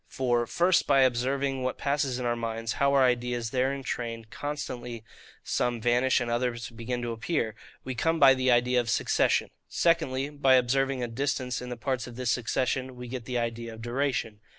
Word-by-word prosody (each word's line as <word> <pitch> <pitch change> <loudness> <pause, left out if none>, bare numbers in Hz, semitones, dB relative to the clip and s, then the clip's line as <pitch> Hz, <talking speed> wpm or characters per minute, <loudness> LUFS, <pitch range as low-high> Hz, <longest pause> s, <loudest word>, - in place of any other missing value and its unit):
For, 120 -2 0
First, 175 +6 +2
by 135 - +5
observing 130 +2 +1
what 130 0 -2
passes 140 -3 0
in 125 - -3
our 120 0 +1
minds, 115 0 -3
how 140 0 +2
our 135 - +5
ideas 120 -2 0
there 130 +1 +1
in 140 -1 -5
train 115 -2 -4
constantly 125 -5 -5 0.4
some 120 -1 -1
vanish 120 +3 +3
and 120 -2 -2
others 120 0 -2
begin 120 +1 -4
to 120 - -2
appear, 115 0 -1 0.3
we 130 - -4
come 165 +6 0
by 135 -2 +8
the 130 0 +1
idea 125 +1 +3
of 120 -1 -2
SUCCESSION. - - +2 0.2
Secondly, 145 -5 +1
by 135 -3 +4
observing 130 +1 +1
a - - -1
distance 125 +1 -2
in 125 - -6
the 125 - -5
parts 125 +1 -2
of 120 - -10
this 125 0 -1
succession, 130 +2 -1
we 125 0 -8
get 120 -1 -6
the 125 -1 -2
idea 115 -1 -3
of 110 - -11
DURATION. 120 -3 -1
125 Hz, 195 wpm, -28 LUFS, 120-135 Hz, 0.4 s, by